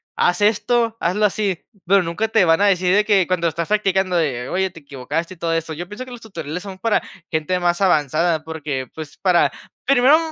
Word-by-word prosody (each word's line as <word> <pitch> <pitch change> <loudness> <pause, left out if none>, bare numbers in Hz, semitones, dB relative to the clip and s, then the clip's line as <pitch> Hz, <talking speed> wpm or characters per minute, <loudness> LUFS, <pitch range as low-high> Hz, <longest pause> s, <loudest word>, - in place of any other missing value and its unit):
"Haz 180 +2 +1
esto, 225 +2 +2
hazlo 195 +5 +1
así", 200 -3 -1 0.2
pero, 195 0 +4
nunca 170 +6 -2
te 220 -4 +3
van 165 +2 +3
a 205 - +5
decir 180 -2 +2
de 210 +1 +3
que, 200 -4 +3
cuando 180 -2 0
estás 165 +2 -3
practicando 190 -3 +1
de: 135 -7 0
"Oye, 190 +1 0
te 165 -2 -14
equivocaste" 145 +5 -4
y - - -25
todo 165 0 -1
eso. 165 -1 -2
Yo 175 +3 -6
pienso, 220 +6 -7
que 255 - -12
los 240 -2 -9
tutoriales 180 -6 -6
son 195 -2 -8
para 220 +2 +1 0.3
gente 160 +4 0
más 175 +1 0
avanzada, 160 -2 +2
porque, 150 -5 -4
pues, 155 -2 -9
para 180 -3 +3 0.3
primero 275 +3 +5
180 Hz, 210 wpm, -20 LUFS, 165-205 Hz, 0.3 s, a